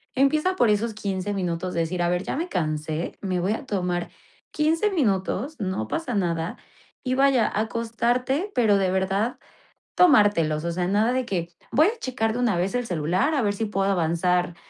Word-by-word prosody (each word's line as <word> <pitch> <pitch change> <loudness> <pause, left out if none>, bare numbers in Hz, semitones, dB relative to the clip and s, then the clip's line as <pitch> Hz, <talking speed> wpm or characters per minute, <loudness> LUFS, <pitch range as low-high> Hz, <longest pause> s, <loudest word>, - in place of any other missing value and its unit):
Empieza 305 +7 +2
por 240 - +4
esos 215 +2 +1
15 200 -1 -3
minutos 180 -2 -2
de 170 - 0
decir: 175 +2 -2
"A 175 - +1
ver 180 +1 0
ya - - -3
me 340 +4 -3
cansé, 155 - -2
me 185 -2 -1
voy 190 +4 0
a 250 - -5
tomar 180 -6 -2 0.4
15 325 +7 +1
minutos, 250 - 0
no 185 - -2
pasa 265 - -3
nada" 170 -3 -1 0.5
y 255 -1 0
vaya 270 -3 +4
a 210 - -1
acostarte 240 - -1
pero 215 -4 +4
de 190 -2 +1
verdad 195 +5 0 0.6
tomártelos, 205 - +4
o 170 - -1
sea 175 +1 -1
nada 210 +5 +2
de 255 0 0
que: 175 -6 -2 0.2
"Voy 310 +5 +5
a 455 +2 -2
checar 225 -4 -1
de 245 - -3
una 235 -7 +1
vez 185 +6 -1
el 245 0 -1
celular 180 - 0
a 275 - +2
ver 205 -3 +1
si 220 +2 -2
puedo 195 -2 0
avanzar 175 0 +1
205 Hz, 190 wpm, -24 LUFS, 180-250 Hz, 0.6 s, Voy